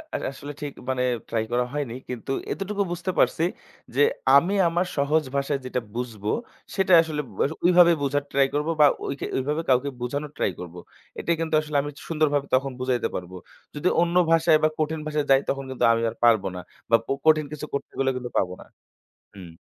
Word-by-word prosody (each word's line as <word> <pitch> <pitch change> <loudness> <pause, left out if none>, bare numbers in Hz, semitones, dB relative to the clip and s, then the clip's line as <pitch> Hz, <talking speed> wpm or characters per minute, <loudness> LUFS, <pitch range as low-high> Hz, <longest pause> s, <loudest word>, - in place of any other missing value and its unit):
আ - - +1
আসলে 145 +1 -8
ঠিক 145 -1 -4 0.2
মানে 130 -1 0 0.3
ট্রাই 110 -1 0
করা 125 0 +1
হয়নি। 140 -6 -3 0.2
কিন্তু 125 +2 -5 0.2
এতটুকু 200 +1 -2
বুঝতে 175 +2 -2
পারছি 165 - +3 0.5
যে, 145 - +3 0.3
আমি 175 +8 +4
আমার 175 +2 +1
সহজ 150 +3 +2
ভাষায় 140 0 0
যেটা 125 -1 -2
বুঝবো, 110 -4 -4 0.5
সেটা 190 -2 +2
আসলে 155 -2 -3 0.2
ব - - -11 0.3
ওইভাবে 175 -1 +7
বুঝার 145 0 0
ট্রাই 135 -1 +3
করব 150 +2 -1
বা 150 - +8 0.2
ওইকে, 140 - -4
ওইভাবে 150 +5 -1
কাউকে 130 +2 +3
বুঝানোর 145 +4 -3
ট্রাই - - +1
করব। 90 -1 -8 0.4
এটাই 170 - 0
কিন্তু 160 -1 -3
আসলে 150 -1 -2
আমি 145 - -5 0.2
সুন্দরভাবে 150 -3 +1
তখন 135 +1 0
বুঝাইতে 130 -1 0
পারব। 90 0 -5 0.4
যদি 145 +5 -1
অন্য 175 0 0 0.2
ভাষায় 160 -1 +5
বা - - +6
কঠিন 155 +1 -1
ভাষায় 150 -1 -1
যাই, 135 0 +7
তখন 135 0 -1
কিন্তু 130 - -3
আমি 115 - 0
আর 110 - -9
পারব 115 -4 +5
না। - - -5 0.3
বা 115 - +6
ক - - -18 0.2
কঠিন 155 -1 +5
কিছু 150 0 -5
করতে 140 - -4
গেলে 135 0 +2
কিন্তু 125 -1 -5
পাব 90 - +2
না। - - -13 0.7
হুম। 85 -4 -12
145 Hz, 190 wpm, -25 LUFS, 125-155 Hz, 0.7 s, বা